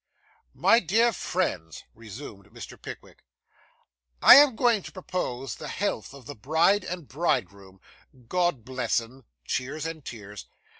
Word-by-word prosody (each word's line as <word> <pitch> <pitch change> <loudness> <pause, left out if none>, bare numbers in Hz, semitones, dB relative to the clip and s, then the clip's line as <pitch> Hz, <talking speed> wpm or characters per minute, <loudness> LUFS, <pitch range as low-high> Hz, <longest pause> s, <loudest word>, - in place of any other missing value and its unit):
'My 230 - +4
dear 230 +5 +2
friends,' 90 - -3
resumed 110 -2 -11
Mr. - - -11
Pickwick, - - -11 1.0
'I - - +11
am 275 -2 +7
going 235 -3 +2
to - - -10
propose 135 - -4
the - - -8
health 170 - -3
of 135 -3 -14
the 145 - -7
bride 160 - +2
and 175 -5 -6
bridegroom 100 - -3 0.5
God 175 -7 0
bless 130 -2 0
'em 120 +2 -13 0.2
(cheers 135 - -3
and 160 -2 -6
tears). 105 -5 -9
140 Hz, 135 wpm, -26 LUFS, 115-180 Hz, 1.0 s, I